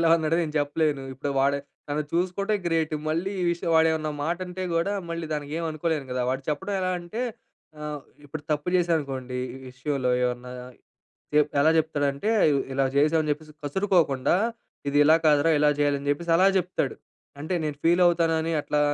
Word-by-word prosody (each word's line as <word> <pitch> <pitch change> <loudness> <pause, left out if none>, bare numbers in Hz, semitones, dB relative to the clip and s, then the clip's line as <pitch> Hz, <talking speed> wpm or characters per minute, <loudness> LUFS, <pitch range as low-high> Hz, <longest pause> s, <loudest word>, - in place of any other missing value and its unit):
ఇలా 165 -1 +4
అన్నాడు" 160 -1 0
అని 170 - +1
నేను 155 -1 -6
చెప్పలేను. 145 -1 0
ఇప్పుడు 140 +2 -3
వాడు 140 +1 +2 0.3
తను 150 +1 0
చూసుకుంటే, 185 +4 0
గ్రేట్ 160 -2 0
మళ్ళీ 165 +5 -1
ఈ - - +1
విషయం 170 0 -2
వాడు 160 0 +5
ఏమన్నా 155 -1 -2
మాటంటే 180 +3 -3
గూడా 170 +5 +1 0.2
మళ్ళీ 170 -1 -3
దానికి 145 -1 -5
ఏమనుకోలేను 160 -3 -2
గదా. 125 - -1
వాడు 130 +1 -2
చెప్పడం 190 +7 -3
ఎలా 185 0 0
అంటే 175 +7 -6 0.6
ఆహ్, 150 -1 -5 0.2
ఇప్పుడు 145 +1 -7
తప్పు 150 +2 -2
జేశాననుకోండి, 140 -7 -1 0.2
ఈ - - -9
విషయంలో 130 -1 -1
ఏమన్నా 125 0 -3 0.8
చె 150 - +7 0.2
ఎలా 155 +3 +5
జెప్తాడంటే, 145 +3 0 0.4
ఇలా 135 0 +1
జేశాం 150 +3 +3
అని 155 - -4
చెప్పేసి 155 +1 -8
కసురుకోకుండా, 160 -5 +2 0.6
"ఇది 140 - -1
ఇలా 155 +2 +6
కాదురా, 150 +1 +4
ఇలా 150 0 +4
జేయాలని" 145 -1 +1
జేప్పేసి 165 +4 -1
అలా 185 +3 +5
జెప్తాడు. 180 0 0 0.5
అంటే 160 +5 -2
నేను 150 -2 -3
ఫీల్ 175 +2 +4
అవుతానని 165 -1 +2
అట్లా 150 0 -1
155 Hz, 170 wpm, -26 LUFS, 145-170 Hz, 0.8 s, చె